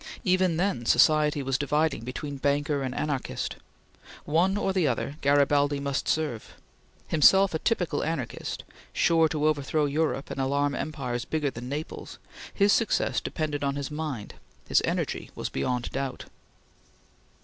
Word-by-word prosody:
Even 185 -3 +2
then 175 -9 0
society 150 +3 +4
was 135 -1 0
dividing 150 -2 0
between 140 +4 -5
banker 145 +1 0
and 130 -1 -3
anarchist. 145 -4 -3 0.7
One 175 +6 +2
or 195 -2 0
the 180 -5 +2
other, 140 +3 -2
Garibaldi 145 0 +3
must 140 -1 -2
serve. 150 -8 -2 0.5
Himself 190 +5 +5
a 160 - 0
typical 175 -9 0
anarchist, 155 -7 -4 0.3
sure 165 -1 +3
to 150 -1 -1
overshadow 150 0 +1
Europe 145 -1 -1
and 135 - -3
alarm 140 +2 +1
empires 125 -7 -3
bigger 150 -3 -1
than 125 +1 -7
Naples, 150 +3 -6 0.3
his 200 0 +3
success 230 - +1
depended 150 -2 -3
on 140 0 0
his 140 0 -4
mind; 150 -8 -4 0.3
his - - +4
energy - - -2
was - - -3
beyond 120 - -2
doubt. 135 -1 -4
145 Hz, 140 wpm, -27 LUFS, 135-160 Hz, 0.7 s, Himself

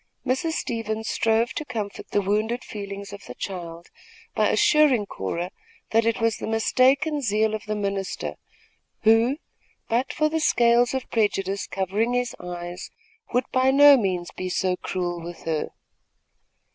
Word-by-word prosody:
Mrs. 265 +6 0
Stevens 220 -4 -3
strove 225 +1 +1
to - - -3
comfort 220 -7 -5
the 205 - +1
wounded 215 +5 0
feelings 200 -1 -7
of 200 - -10
the - - -8
child, 170 -3 -7 0.4
by - - +2
assuring 285 -8 +4
Cora 170 - -4 0.4
that 225 0 +3
it 230 +1 +1
was 230 -2 +1
the - - -5
mistaken 265 +7 +2
zeal 215 -2 +1
of 215 - -4
the 215 - -1
minister, 200 -2 -3 0.7
who, 225 +5 +4 0.5
but 240 +3 +1
for 305 - +1
the 320 +1 -1
scales 240 -4 +3
of 260 - -3
prejudice 200 -3 0
covering 200 +5 -1
his 245 -1 -1
eyes, 175 0 -6 0.4
would 250 0 +1
by 255 0 +3
no 285 +1 +8
means 185 -7 -1
be 185 - -5
so 185 0 0
cruel 175 -2 -3
with 170 0 -9
her. 160 -2 -1
220 Hz, 150 wpm, -24 LUFS, 195-245 Hz, 0.7 s, no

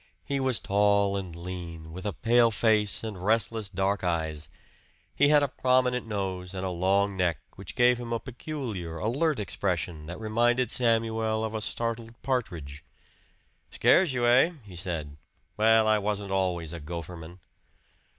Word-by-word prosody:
He 140 -1 -1
was 130 -3 +2
tall 100 0 +2
and 95 -4 -5
lean, 85 -2 -7
with 95 +4 -5
a 100 - -2
pale 115 +8 +4
face 110 -2 +2
and 105 -5 -6
restless 110 0 +1
dark 95 +1 -1
eyes. 80 -4 -2 0.7
He 145 - +4
had 150 0 +5
a - - +2
prominent 125 -2 +1
nose 95 -3 -4
and 95 0 -3
a 95 - -2
long 95 +3 +1
neck, 90 -4 +1 0.2
which 95 -2 -9
gave 125 -1 +4
him 120 -1 -6
a 115 - 0
peculiar, 120 - -6
alert 135 - 0
expression 90 -5 -2
that 90 - -7
reminded 120 +2 +1
Samuel 110 -2 +2
of 110 - -5
a 110 - -3
startled 115 +1 -3
partridge. 85 - -3 0.9
"Scares 185 -6 +4
you, 125 -2 -1
hey?" 125 +8 +5
he 95 -4 -12
said. 85 -5 -4 0.4
"Well, 110 0 +4
I 110 -1 +4
wasn't 100 -1 -3
always 90 -4 -1
a 85 - -6
gopherman." 85 +1 -8
105 Hz, 155 wpm, -27 LUFS, 90-115 Hz, 0.9 s, had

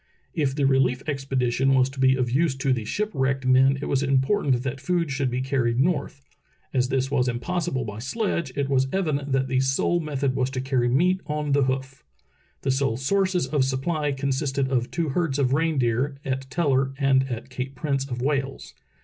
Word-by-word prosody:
If 145 -6 0
the 145 - 0
relief 135 -1 +2
expedition 135 -2 +1
was 130 -1 +4
to 135 - -10
be 130 0 +4
of 125 -2 -1
use 145 +1 +2
to 135 0 +1
the 115 -4 -3
ship 210 - -2
wrecked 135 0 0
men 130 +1 +4
it - - -1
was 135 - 0
important 135 -1 +1
that 135 0 -4
food 170 -1 0
should 135 -1 0
be 125 +1 -2
car 135 0 0
ried 120 +1 0
north. 140 -2 0 0.5
As 125 -1 +1
this 135 0 0
was 130 -3 +2
impossible 130 +1 -2
by 105 -1 -6
sledge, 170 - -2
it 140 -1 0
was 135 -1 +2
evident 145 -7 -1
that 135 0 +1
the 130 0 +1
sole 135 +6 +1
method 140 -4 -1
was 130 0 0
to 135 -1 -4
carry 130 -2 +1
meat 180 +9 +2
on 150 -1 -2
the 140 -1 +3
hoof. 130 0 -3 0.6
The 135 - +1
sole 130 -4 0
sources 185 +6 +1
of 145 -3 +1
supply 145 +3 -1
consisted 135 0 -1
of 125 -2 0
two 165 -3 -2
herds 150 -1 0
of 135 -2 +1
reindeer, 140 -4 +1
at 135 0 -3
Teller 135 -4 +1
and 135 -1 +2
at 120 +2 -6
Cape 130 +1 -5
Prince 140 0 -2
of 125 -1 -4
Wales. 135 -1 -2
135 Hz, 200 wpm, -25 LUFS, 130-145 Hz, 0.6 s, was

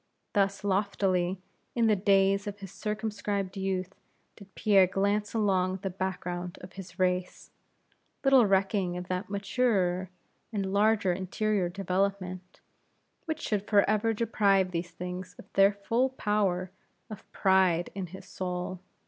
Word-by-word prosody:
Thus 200 -1 +1
loftily, 190 -2 +1 0.4
in 235 -1 +3
the 215 -1 +4
days 195 +1 +3
of 205 0 -5
his 195 -3 -9
circumscribed 205 -2 -3
youth, 190 -1 -2 0.4
did 200 -2 -16
Pierre 195 -3 +5
glance 200 +3 0
along 190 -4 +2
the 195 - -2
background 180 -1 -4
of 180 - -11
his 190 -1 -10
race; 180 -1 -1 0.7
little 270 -5 +6
recking 195 -2 +1
of 180 0 -7
that 185 +2 -2
maturer 200 -3 0 0.4
and 195 -3 -2
larger 205 -2 +3
interior 190 +1 -1
development, 185 0 -2 0.6
which 315 -1 -3
should 205 -2 -2
forever 215 +2 +3
deprive 200 -4 +2
these 170 0 -3
things 180 +1 -7
of - - -12
their 195 +1 +6
full 230 +6 0
power 200 -7 0 0.4
of 215 - -10
pride 185 -3 +3
in 195 -2 -4
his 190 +3 -11
soul. 180 0 -4
195 Hz, 130 wpm, -29 LUFS, 185-205 Hz, 0.7 s, little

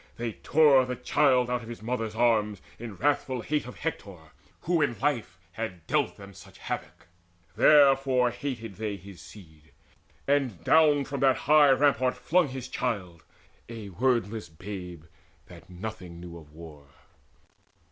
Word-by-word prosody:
They 115 -1 -3
tore 145 -1 +4
the 125 0 -4
child 125 0 +2
Out 125 -1 -2
of 115 - -11
his 115 -2 -9
mother's 115 -2 -3
arms, 110 -3 +2 0.2
in 115 -3 -7
wrathful 135 -1 0
hate 150 -2 -2
Of 125 - -9
Hector, 95 - -6 0.3
who 170 -1 +1
in 130 -6 0
life 120 -8 -2
had 90 -5 -6
dealt 145 -3 0
to - - -27
them 100 0 -11
Such - - -15
havoc; - - -6 0.5
therefore 135 -4 +5
hated 120 -5 -6
they 105 -1 -3
his 95 0 -13
seed, 80 -7 -16 0.5
And 135 - 0
down 150 - +4
from 140 +1 -5
that 135 -1 +3
high 150 0 +6
rampart 135 -2 +3
flung 180 -1 +2
his 130 -2 -7
child 95 -10 -4 0.5
A 110 -3 -8
wordless 115 0 -1
babe 90 -1 -8 0.4
that 85 -1 -15
nothing 90 -2 -8
knew 85 -1 -10
of 80 -3 -13
war! 75 -3 -13
115 Hz, 150 wpm, -27 LUFS, 95-135 Hz, 0.5 s, high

